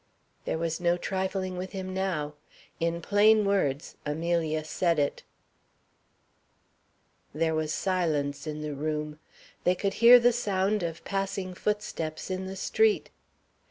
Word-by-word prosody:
There -, -, -1 dB
was 165 Hz, 0 st, -2 dB
no 175 Hz, 0 st, +2 dB
trifling 185 Hz, 0 st, -2 dB
with 185 Hz, +1 st, -5 dB
him 185 Hz, -1 st, -5 dB
now. 180 Hz, -6 st, -2 dB, 0.5 s
In 170 Hz, 0 st, -1 dB
plain 210 Hz, +2 st, +5 dB
words 155 Hz, -9 st, 0 dB
Amelia 160 Hz, 0 st, -1 dB
said 170 Hz, +2 st, 0 dB
it. 145 Hz, -1 st, 0 dB, 2.1 s
There 160 Hz, +1 st, +1 dB
was 155 Hz, -1 st, -1 dB
silence 155 Hz, -6 st, -1 dB
in 150 Hz, 0 st, -4 dB
the 150 Hz, -1 st, -3 dB
room. 150 Hz, +1 st, -3 dB, 0.4 s
They 180 Hz, -, +3 dB
could 195 Hz, +2 st, -1 dB
hear 245 Hz, +1 st, +10 dB
the 245 Hz, 0 st, +4 dB
sound 205 Hz, -2 st, 0 dB
of 165 Hz, -1 st, -4 dB
passing 195 Hz, -1 st, -2 dB
footsteps 185 Hz, -5 st, -3 dB
in 185 Hz, 0 st, -3 dB
the 190 Hz, -, -6 dB
street. 435 Hz, -, +1 dB
180 Hz, 130 wpm, -28 LUFS, 155-195 Hz, 2.1 s, hear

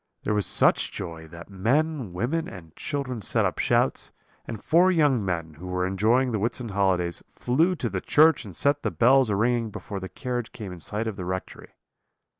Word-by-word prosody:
There 105 Hz, -, 0 dB
was 105 Hz, -4 st, 0 dB
such -, -, +3 dB
joy, 80 Hz, -1 st, -7 dB
that 85 Hz, +2 st, -11 dB
men, 130 Hz, +6 st, 0 dB
women, 125 Hz, -, -2 dB
and 80 Hz, -4 st, -12 dB
children 130 Hz, -5 st, -4 dB
set -, -, +1 dB
up -, -, -2 dB
shouts; -, -, +1 dB, 0.4 s
and 110 Hz, -, -5 dB
four 175 Hz, -, +4 dB
young 145 Hz, -, +3 dB
men, 85 Hz, -4 st, -3 dB
who 90 Hz, -, -8 dB
were 90 Hz, 0 st, -1 dB
enjoying 110 Hz, +7 st, +2 dB
the 110 Hz, -, -1 dB
Whitsun 115 Hz, +2 st, -2 dB
holidays, 95 Hz, -3 st, 0 dB
flew 160 Hz, +9 st, +1 dB
to -, -, -3 dB
the -, -, -3 dB
church 155 Hz, +2 st, +4 dB
and -, -, -10 dB
set 140 Hz, 0 st, +1 dB
the -, -, -1 dB
bells 130 Hz, +1 st, +4 dB
a 100 Hz, -, +1 dB
ringing 115 Hz, +2 st, +1 dB
before 100 Hz, -1 st, -7 dB
the 95 Hz, 0 st, -7 dB
carriage 120 Hz, +5 st, -4 dB
came 100 Hz, -4 st, -7 dB
in 90 Hz, -, -10 dB
sight 105 Hz, +7 st, -3 dB
of 110 Hz, -3 st, -4 dB
the 90 Hz, -, -5 dB
rectory. 95 Hz, +1 st, -6 dB
110 Hz, 200 wpm, -25 LUFS, 95-130 Hz, 0.4 s, four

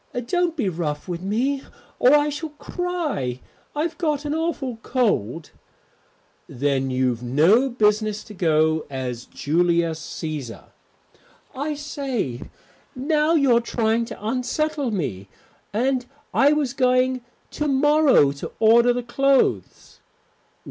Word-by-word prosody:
"Don't 350 Hz, +4 st, 0 dB
be 235 Hz, -9 st, 0 dB
rough 160 Hz, -4 st, -3 dB
with 175 Hz, -1 st, -4 dB
me 245 Hz, +8 st, 0 dB, 0.4 s
or 255 Hz, +4 st, +6 dB
I 295 Hz, 0 st, +3 dB
shall 300 Hz, +2 st, -5 dB
cry. 300 Hz, -, -3 dB, 0.4 s
I've 320 Hz, +3 st, -2 dB
got 300 Hz, -4 st, -1 dB
an 295 Hz, -, -1 dB
awful 310 Hz, -7 st, -2 dB
cold." 170 Hz, -, -1 dB, 1.0 s
"Then 135 Hz, 0 st, -1 dB
you've 125 Hz, -2 st, 0 dB
no 165 Hz, -, +3 dB
business 215 Hz, -2 st, +1 dB
to 215 Hz, -, -12 dB
go 160 Hz, -3 st, +1 dB
as 125 Hz, -3 st, -5 dB
Julius 170 Hz, +1 st, 0 dB
Cæsar." 155 Hz, -7 st, -6 dB, 0.8 s
"I 290 Hz, +3 st, -3 dB
say, 270 Hz, -, -3 dB, 0.5 s
now 300 Hz, +4 st, +1 dB
you're 260 Hz, -6 st, +4 dB
trying 230 Hz, 0 st, 0 dB
to 220 Hz, -3 st, -9 dB
unsettle 260 Hz, +4 st, -1 dB
me. 105 Hz, -, -3 dB, 0.4 s
And 250 Hz, +3 st, 0 dB, 0.3 s
I 280 Hz, +1 st, +5 dB
was 295 Hz, -4 st, 0 dB
going 255 Hz, -1 st, +2 dB, 0.3 s
to 300 Hz, -, -2 dB
morrow 290 Hz, -, +4 dB
to 140 Hz, -, -7 dB
order 235 Hz, +2 st, +5 dB
the 245 Hz, 0 st, -3 dB
clothes." 270 Hz, +3 st, 0 dB
240 Hz, 120 wpm, -23 LUFS, -, 1.0 s, or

